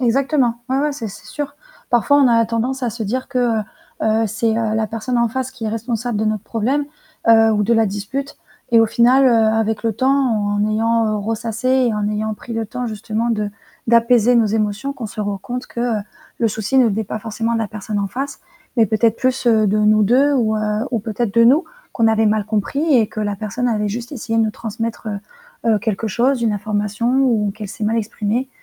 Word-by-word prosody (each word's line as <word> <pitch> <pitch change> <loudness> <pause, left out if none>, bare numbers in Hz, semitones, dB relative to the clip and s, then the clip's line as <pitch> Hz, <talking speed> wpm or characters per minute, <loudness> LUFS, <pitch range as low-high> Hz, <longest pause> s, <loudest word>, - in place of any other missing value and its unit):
Exactement, 260 0 +2 0.2
ouais 265 - +2
ouais, 295 +1 0
ça 235 -6 -5
c'est 195 - -12
sûr. 290 -1 -5 0.4
Parfois 245 +4 +3
on 270 -3 +5
a 230 -1 +4
tendance 245 +4 -2
à 245 - +1
se 225 +2 -6
dire 255 +6 -3
que, 260 - -2 0.2
heu, - - -3 0.4
heu, 220 +1 +2
c'est, 225 +2 -1
heu, 220 -2 0
la 220 0 0
personne 230 +3 -2
en 235 -1 +2
face 260 +2 -3
qui 255 -4 -8
est - - 0
responsable 230 +1 -3
de 220 - 0
notre 215 -1 -1
problème, 260 +7 -1 0.4
heu, 225 -1 +6
ou 210 -1 +1
de 235 +3 +2
la 225 -1 +3
dispute 210 +8 -4 0.4
et 230 - +7
au 225 - +4
final, 245 +4 +4
heu, - - +5
avec 220 -1 +2
le 225 -1 0
temps 260 +5 +1 0.2
en 205 -1 0
ayant, 225 +1 +1
heu, 215 - 0
ressassé 225 +3 -3
et 255 -3 +3
en 210 -1 -1
ayant 215 +1 -2
pris 235 - -10
le 225 -1 -2
temps 250 +4 -4
justement 220 +1 -2
de 210 -2 -1 0.4
d'apaiser 235 0 +4
nos 230 -2 +4
émotions 215 +5 -1
qu'on 240 -5 -6
se 215 - -7
rend 205 -1 -2
compte 250 +5 -6
que, 235 - -6
heu, 235 -3 0 0.4
le 230 - +2
souci 220 +5 0
ne 255 - +6
venait 220 0 0
pas 215 - -5
forcément 225 +1 -3
de - - +1
la 225 - -1
personne 210 0 -4
en 200 - 0
face, 270 +7 -5 0.4
mais 225 - +5
peut-être 220 +2 +2
plus, 255 -1 -1
heu, 220 -2 +4
de 210 +2 +1
nous 215 0 +4
2 270 +7 +4
ou 225 -5 +1
heu, 215 +2 -1
ou 230 - 0
peut-être 220 0 -3
de 230 - +5
nous, 280 +9 +5 0.3
qu'on 230 -2 +2
avait 220 0 +3
mal 215 0 +1
compris 275 +9 0
et 225 -3 +3
que 215 - -9
la 205 -1 -1
personne 215 +5 -3
avait 210 -2 0
juste 235 +6 -5
essayé 225 -3 -2
de 225 - +4
nous 215 - 0
transmettre, 225 0 -5
heu, 205 -1 -3 0.5
heu, 215 - +3
quelque 220 0 -2
chose, 245 +5 +1
une 225 -2 +2
information 210 +4 -1
ou 220 -6 +2
qu'elle 210 -2 -7
s'est 210 - -5
mal 225 +2 +1
exprimée 225 +4 -2
225 Hz, 230 wpm, -19 LUFS, 215-245 Hz, 0.5 s, et